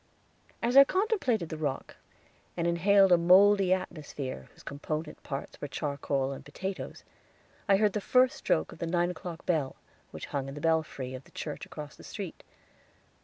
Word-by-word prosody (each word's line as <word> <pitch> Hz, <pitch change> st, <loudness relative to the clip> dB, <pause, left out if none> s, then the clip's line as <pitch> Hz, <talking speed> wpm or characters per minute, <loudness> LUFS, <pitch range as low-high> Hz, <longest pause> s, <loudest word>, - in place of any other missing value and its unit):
As 240 Hz, +2 st, +1 dB
I 275 Hz, -, +11 dB
contemplated 335 Hz, -, 0 dB
the 160 Hz, -, -5 dB
rock, 145 Hz, -4 st, -3 dB, 0.6 s
and 170 Hz, -, 0 dB
inhaled 190 Hz, +3 st, +4 dB
a 175 Hz, -, +7 dB
moldy 190 Hz, +2 st, +6 dB
atmosphere 155 Hz, -7 st, -3 dB
whose -, -, -19 dB
component 150 Hz, +2 st, -5 dB
parts 135 Hz, 0 st, -6 dB
were 145 Hz, -, -3 dB
charcoal 140 Hz, -2 st, -2 dB
and 135 Hz, -, -7 dB
potatoes, 190 Hz, +7 st, -6 dB, 0.7 s
I 195 Hz, -, +6 dB
heard 210 Hz, -1 st, +2 dB
the 210 Hz, -, -1 dB
first 255 Hz, +4 st, +3 dB
stroke 80 Hz, -, 0 dB
of -, -, -12 dB
the 170 Hz, -, -2 dB
nine 175 Hz, +1 st, +1 dB
o'clock 170 Hz, -1 st, -8 dB
bell, 155 Hz, -6 st, 0 dB, 0.3 s
which -, -, -7 dB
hung 135 Hz, -1 st, -1 dB
in 135 Hz, -, -7 dB
the -, -, -6 dB
belfry 155 Hz, -5 st, -1 dB
of 130 Hz, +1 st, -8 dB
the -, -, -18 dB
church 150 Hz, -, -6 dB
across 150 Hz, -2 st, -8 dB
the -, -, -15 dB
street. -, -, -7 dB
170 Hz, 170 wpm, -29 LUFS, 145-195 Hz, 0.7 s, I